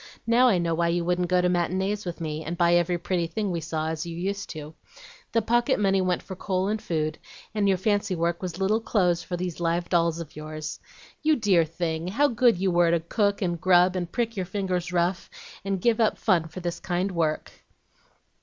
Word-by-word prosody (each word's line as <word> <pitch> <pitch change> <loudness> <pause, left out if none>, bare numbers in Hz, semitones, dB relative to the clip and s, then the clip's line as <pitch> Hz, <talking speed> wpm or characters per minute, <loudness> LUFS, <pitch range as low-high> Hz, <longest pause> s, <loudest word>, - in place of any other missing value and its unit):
Now 240 +2 +5
I 210 -7 +4
know 170 -1 0
why 170 +1 +1
you 170 0 0
wouldn't 180 0 +1
go 180 0 +3
to 180 - +2
matinees 185 +4 0
with 175 - -5
me, 155 -1 -4
and 170 +2 -4
buy 170 0 +4
every 175 0 +2
pretty 175 0 -1
thing 205 +2 -2
we 170 -1 -2
saw 160 -1 -2
as 160 -1 -3
you 170 -1 -6
used 200 +3 -3
to. 155 -1 -8 0.6
The 230 - +1
pocket 240 +1 +2
money 195 -2 +2
went 180 -1 0
for 190 - -7
coal 185 +1 -1
and 215 0 -1
food, 155 -2 -2 0.3
and 210 -2 +1
your 190 - +3
fancy 205 0 0
work 170 0 -1
was 180 -2 -4
little 205 +4 +1
clothes 180 -6 +1
for 175 0 -4
these 180 -1 -4
live 170 0 -1
dolls 170 -2 +2
of 165 -3 -8
yours. 155 0 -6 0.4
You 310 0 +3
dear 195 - +3
thing! 165 0 -3
how 275 +10 +2
good 235 -3 +3
you 190 +1 +1
were 175 -1 +4
to 170 0 +3
cook, 200 +4 0
and 175 -2 -2
grub, 180 0 +4
and 175 -2 -3
prick 230 -1 -1
your 185 -3 -3
fingers 185 -2 -2
rough, 175 0 0 0.3
and 195 -1 -1
give 235 +4 +2
up 220 -2 +2
fun, 175 -6 +2
for 165 +3 -8
this 175 0 -3
kind 180 +2 -1
work!" 160 -3 -1
180 Hz, 220 wpm, -26 LUFS, 170-195 Hz, 0.6 s, Now